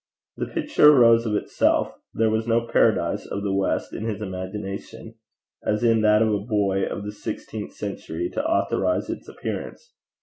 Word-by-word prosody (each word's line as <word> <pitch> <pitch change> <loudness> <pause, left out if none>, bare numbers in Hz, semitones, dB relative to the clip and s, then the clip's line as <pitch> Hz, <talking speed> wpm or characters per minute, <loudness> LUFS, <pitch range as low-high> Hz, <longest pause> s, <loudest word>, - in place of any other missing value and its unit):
The - - -3
picture 300 - +4
arose 115 -2 +5
of 105 - 0
itself: - - +1 0.2
there 110 0 +1
was 110 +1 -1
no 115 0 +3
paradise 105 -7 +1
of 100 - -4
the 100 -2 -1
west 95 0 -1
in 110 - -4
his 110 -3 -3
imagination, 100 +3 -6 0.5
as 105 +2 0
in 115 -1 +4
that 105 0 +5
of 110 -1 +1
a 105 - +1
boy 100 -3 0
of 100 - -5
the 105 - -4
sixteenth 105 - -6
century, 85 +2 -4
to - - -2
authorize 330 +2 0
its - - -7
appearance. 480 0 -6
110 Hz, 170 wpm, -24 LUFS, 100-115 Hz, 0.5 s, arose